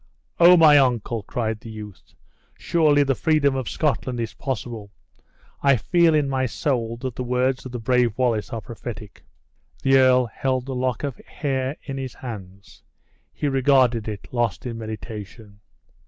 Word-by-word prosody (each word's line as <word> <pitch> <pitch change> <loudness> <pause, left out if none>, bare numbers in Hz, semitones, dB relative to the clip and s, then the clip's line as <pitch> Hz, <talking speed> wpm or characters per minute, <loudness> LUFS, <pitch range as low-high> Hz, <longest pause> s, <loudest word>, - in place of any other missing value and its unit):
"O! 175 +1 +8
my 150 -3 +7
uncle," 120 -3 0
cried 110 +2 -3
the 115 - -11
youth, 105 -4 -11 0.4
"surely 150 -4 +3
the 135 -1 +1
freedom 140 0 +2
of 130 -3 -3
Scotland 135 -5 -1
is 115 -2 -3
possible. 120 -6 -5 0.7
I 140 -1 +5
feel 170 - +3
in 150 -2 +2
my 130 -1 0
soul, 115 -2 -2
that 130 -2 -3
the 125 - -3
words 125 +1 0
of - - -10
the 125 - -4
brave 120 -1 +1
Wallace 120 -5 0
are 115 -2 -4
prophetic." 110 -3 -9 0.6
The 135 0 +5
earl 130 -1 +5
held 130 +2 -2
the 135 - -5
lock 125 -1 -2
of 140 -3 -3
hair 135 0 -3
in 135 -1 -5
his 130 -1 -6
hands; 100 - -10 0.5
he 150 - -3
regarded 130 -4 +3
it, 105 -2 -6
lost 120 -2 -1
in 115 -2 -5
meditation. 110 -1 -8
125 Hz, 160 wpm, -23 LUFS, 115-135 Hz, 0.7 s, O